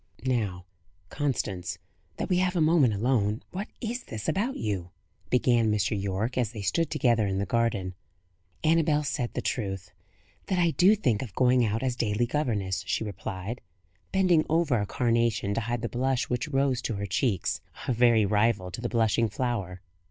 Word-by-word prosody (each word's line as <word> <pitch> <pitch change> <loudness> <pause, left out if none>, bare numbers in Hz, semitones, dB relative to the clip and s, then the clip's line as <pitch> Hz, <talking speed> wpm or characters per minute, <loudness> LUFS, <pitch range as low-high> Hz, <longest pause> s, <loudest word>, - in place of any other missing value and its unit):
"Now, 105 -9 -1 0.4
Constance, 95 - -2 0.4
that - - -2
we 180 - +2
have 185 0 +1
a - - +2
moment 155 -8 +4
alone, 110 -1 +1
what 195 +3 -4
is 240 +2 -3
this 110 -1 -6
about 205 - 0
you?" 95 -5 -3 0.4
began 120 -3 +3
Mr. 105 +1 +1
Yorke, 100 +5 -2
as 120 -2 -1
they 105 -3 -6
stood 160 - +1
together 120 -8 +2
in 95 -1 -1
the 100 - 0
garden. 100 -3 0 0.7
"Annabel 155 -2 +3
said 135 -4 -2
the - - -2
truth 95 -6 -3 0.6
that 190 - 0
I 170 -2 +3
do 185 +6 +5
think 125 - 0
of 115 -8 -7
going 125 -1 +4
out 110 +2 0
as 125 -2 0
daily 115 0 0
governess," 110 -8 -1
she - - 0
replied, 100 +2 -5 0.5
bending 180 -4 +4
over 155 -7 +2
a 100 - -2
carnation 115 -4 +1
to 115 - -1
hide 115 +1 -3
the - - 0
blush 130 +1 -1
which 125 +3 -1
rose 135 -3 +1
to 115 - -2
her 100 0 -3
cheeks, 100 0 0 0.3
a 125 - +2
very 115 -2 +4
rival 105 -2 +1
to 90 - -6
the 120 - -2
blushing 115 -1 +2
flower. 100 -6 -3
115 Hz, 175 wpm, -27 LUFS, 100-135 Hz, 0.7 s, do